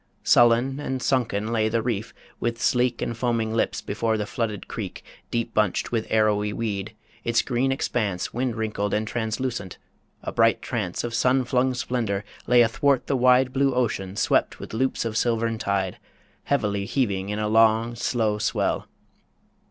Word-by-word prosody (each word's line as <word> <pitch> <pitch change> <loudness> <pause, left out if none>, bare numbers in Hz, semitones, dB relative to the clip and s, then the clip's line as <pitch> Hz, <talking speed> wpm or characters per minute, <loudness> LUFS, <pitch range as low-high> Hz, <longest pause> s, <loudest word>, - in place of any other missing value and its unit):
Sullen 120 +3 +4
and 130 -3 -3
sunken 115 -5 0
lay 110 -2 +1
the 115 0 0
reef, 115 -2 -2 0.3
with 115 0 -2
sleek 125 0 +1
And 115 - -3
foaming 115 -2 -1
lips, 115 - 0
before 110 +2 -1
the 105 - -2
flooded 105 -2 -3
creek - - -6 0.3
Deep 115 -1 -2
bunched 105 -4 +1
with 115 -2 -1
arrowy 105 -1 +2
weed, 105 -1 -3 0.3
its 115 0 +2
green 130 +1 0
expanse 105 -8 -1
Wind 125 -1 -1
wrinkled 105 -2 -1
and 110 +1 -1
translucent... 115 -3 -3 0.5
A - - -3
bright 115 0 +3
trance 105 -8 -3
Of 120 - -4
sun 130 +3 +3
flung 130 +1 +1
splendour 115 -5 -2 0.2
lay 120 -1 +6
athwart 130 +4 +2
the 140 - 0
wide 125 0 +4
Blue 135 -1 +2
ocean 100 -6 -1
swept 110 - +1
with - - -9
loops 130 +1 0
of 110 -1 -3
silvern 115 -1 0
tide 95 -3 -1 0.5
Heavily 105 -8 0
heaving 100 -5 -1
in 105 - -2
a 105 0 -1
long, 115 +1 +4
slow 110 -3 0
swell. 105 - 0
115 Hz, 160 wpm, -25 LUFS, 105-125 Hz, 0.5 s, lay